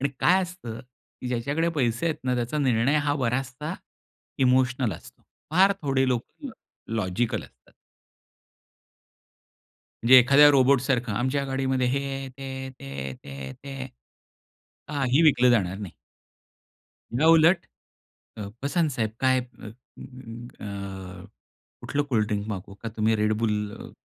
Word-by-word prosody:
आणि 140 - +1
काय 185 +1 +5
असतं, 150 -11 -7 0.4
की 125 - -4
ज्याच्याकडे 140 +7 0
पैसे 120 +3 0
आहेत 160 - 0
ना 125 -1 +1
त्याचा 120 +5 -2
निर्णय 130 +1 +2
हा 145 - +2
बराचसा 135 +5 -2 0.7
इमोशनल 125 -3 +2
असतो. - - -13 0.3
फार 190 +5 +5
थोडे 135 -2 +1
लोक 120 -2 +1 0.2
ल 275 - -4 0.5
लॉजिकल 105 +3 -1
असतात. - - -19 2.3
जे 130 +2 +9
एखाद्या 140 +4 +7
रोबोट 135 -1 +4
सारखं, 125 -4 0
"आमच्या 130 +5 0
गाडीमध्ये 135 -1 0
हे 140 +2 0
आहे, 135 0 -4
ते 130 +1 -13
आहे, 130 0 -5
ते 130 - -15
आहे, 70 -1 -5
ते - - -16
आहे, 70 -1 -7
ते 140 - -11
आहे." 130 -1 -5 1.0
काही 140 0 +2
विकलं 125 -6 +5
जाणार 95 -5 +1
नाही. 100 -5 -7 1.3
याउलट 165 +2 +5 0.7
अ, 105 - -5 0.2
"बसाना 155 +3 +1
साहेब 115 -5 -2
काय 130 -1 +3
अ, 120 -3 -12 2.1
कुठलं 145 0 -1
कोल्डड्रिंक 105 -5 -1
मागवू 100 -1 -6
का? 115 +3 -7
तुम्ही 110 0 +1
Red 105 0 +1
Bull 105 -2 -2
130 Hz, 130 wpm, -26 LUFS, 115-140 Hz, 2.3 s, जे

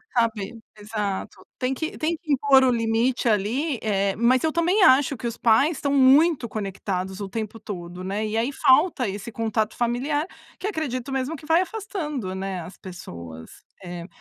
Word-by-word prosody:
Sabe 230 -2 0 0.2
Exato. 210 -2 -4
Tem 255 +1 0
que 315 +4 -4
tem 320 +2 0
que 315 -3 -6
impor 270 -1 +5
o 255 - +4
limite 230 +2 +1
ali, 235 +7 0
eh, 200 -2 0
mas 245 +4 +3
eu 320 - +2
também 350 +5 +2
acho 265 0 +5
que 240 - -8
os 235 - -5
pais 270 +7 +3
estão 280 +1 -1
muito 275 0 +5
conectados 195 -2 -4
o 200 -2 -5
tempo 220 +1 -5
todo, 180 -3 -7
né. 200 +3 -2
E 215 +1 -2
aí 235 +5 0
falta 270 -1 +3
esse 200 +4 -5
contato 220 -1 -1
familiar, 260 +6 0 0.3
que 400 - -3
acredito 275 - -3
mesmo 270 +4 -2
que 305 - -12
vai 325 +3 +4
afastando, 340 - -4
né, 190 -2 -4
as 180 +4 -10
pessoas. 85 - -9 0.3
É. 175 -1 -7
235 Hz, 175 wpm, -24 LUFS, 200-285 Hz, 0.3 s, impor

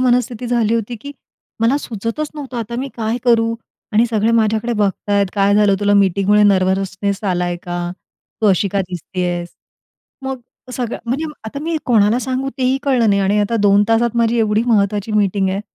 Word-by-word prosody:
मनस्थिती 245 -1 +1
झाली 230 -2 +1
होती, 230 +1 -2
की 285 +6 -9 0.5
मला 230 +5 +3
सुचतचं 230 +4 -4
नव्हतं 270 -4 -7
आता 235 0 -4
मी 275 - -4
काय 225 +1 -1
करू. 230 -1 +3 0.4
आणि 220 +3 +4
सगळे 225 0 +1
माझ्याकडे 220 +1 +1
बघतायत. 205 -1 0
काय 200 0 +2
झालं 205 -1 +4
तुला? 205 0 +3
मीटिंगमुळे 200 +1 +3
नर्वसनेस 195 0 +1
आलाय 175 -2 0
का? 175 0 -4 0.5
तू 215 - +2
अशी 195 +1 +2
का 200 +1 -1
दिसतीयेस? 175 0 -3 0.7
मग 265 -1 -4 0.3
सगळं 245 -2 -3
म्हणजे 275 +7 -1 0.2
आता 220 +6 -6
मी 330 0 -1
कोणाला 225 -1 +3
सांगू 260 +1 -2
तेही 260 +1 +1
कळलं 250 -5 +2
नाही. 200 - +2
आणि 195 +2 +2
आता 230 +3 0
2 205 0 +4
तासात 235 +1 +2
माझी 235 0 +2
एवढी 215 0 +2
महत्त्वाची 205 -1 +1
मीटिंग 200 -2 +1
आहे. 195 +2 -2
215 Hz, 170 wpm, -18 LUFS, 200-235 Hz, 0.7 s, आणि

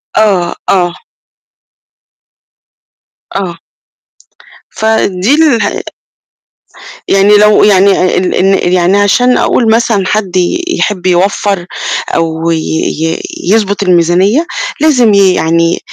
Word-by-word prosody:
آه، 190 -5 +1 0.2
آه. 175 -2 +1 2.4
آه. 180 -4 -4 1.1
فدي 220 0 0
اله 305 -7 +1 1.3
يعني 200 +2 +3
لو 210 0 +4
يعني 195 -1 +3
آآ 185 - 0
ال 180 0 -1
إن 190 -1 +1
يعني 180 +2 +2
عشان 245 +5 +2
أقول 225 -3 +1
مثلًا 220 -4 0
حد 195 -4 -2
ي 185 - 0
يحِب 210 - -2
يوفَّر، 185 0 0 0.5
أو 165 0 -1
ي 165 - 0
ي 160 +1 -3 0.2
يضبط 205 0 0
الميزانية، 185 - +2 0.4
لازم 250 -9 +3
ي 195 -2 +4
يعني 165 0 0
195 Hz, 100 wpm, -10 LUFS, 175-215 Hz, 2.4 s, لو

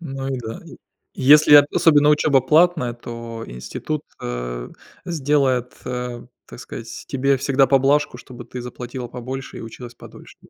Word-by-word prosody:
Ну, 135 -4 -5
и 135 -1 -2
да, 115 -1 -7
и - - -12 0.4
если, 150 +2 +6
от 145 0 +9
особенно, 150 -2 +4
учёба 150 -2 +3
платная, 155 -1 +3
то 115 -1 -8
институт, 140 - -5 0.2
э, - - -5 0.4
сделает, 140 -6 0
э, 125 -1 -5 0.2
так - - -12
скать, 115 -2 -9
тебе 135 0 +1
всегда 135 0 +2
поблажку, 140 +2 +2
чтобы 125 -2 -11
ты 125 +1 -8
заплатила 125 0 -7
побольше 130 +3 -7
и - - -8
училась 120 +2 -10
подольше. - - -14
130 Hz, 150 wpm, -21 LUFS, 120-145 Hz, 0.4 s, от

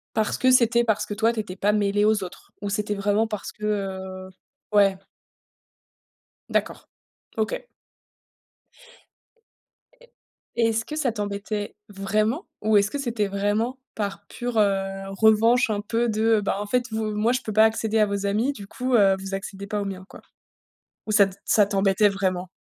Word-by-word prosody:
Parce 220 -1 0
que 255 - +3
c'était 235 -1 +4
parce 220 -3 0
que - - -5
toi 225 +2 +2
tu 225 - -4
étais 185 -4 -5
pas 205 +2 +1
mêlé 205 0 +1
aux 210 -2 +3
autres? 180 - -10
Ou 205 - -3
c'était 210 +1 -1
vraiment 205 +2 +1
parce 210 -2 -5
que, 210 - -16
heu 190 -2 -3 0.4
ouais. 200 -2 +4 1.5
D'accord, - - -2 0.5
OK. 220 0 -1 2.4
E - - -16 0.5
et 230 -1 +3
est-ce 225 0 0
que 305 - -6
ça 280 -6 0
t'embêtait 205 0 -4
vraiment 215 - -1 0.2
ou 215 0 +2
est-ce 200 0 +2
que - - -2
c'était 235 -6 -1
vraiment 205 +5 -1 0.2
par 200 -1 -4
pure, 245 -2 -4
heu, 195 -1 +1
revanche 220 +4 +4
un 205 -1 -1
peu 230 +3 0
de, 220 0 +2
bah, 195 - -1
en - - -3
fait, 250 +4 0
v 220 - -2 0.2
moi 215 +3 +1
je 255 - 0
peux 215 - -5
pas 220 +1 +6
accéder 220 0 +1
à 210 - +5
vos 200 0 -3
amis, 215 +7 +1
du 205 -7 -10
coup, 255 +4 -3
heu, 195 -3 +5
vous 195 0 -7
accédez 195 0 -7
pas 210 -1 -2
aux - - -3
miens, 190 -1 -6
quoi? - - -13 0.9
Ou 215 - -2
ça 205 -1 +6
t 190 0 -10
ça 210 -2 +4
t'embêtait 195 +1 +3
vraiment? 185 -2 -2
210 Hz, 180 wpm, -24 LUFS, 200-225 Hz, 2.4 s, pas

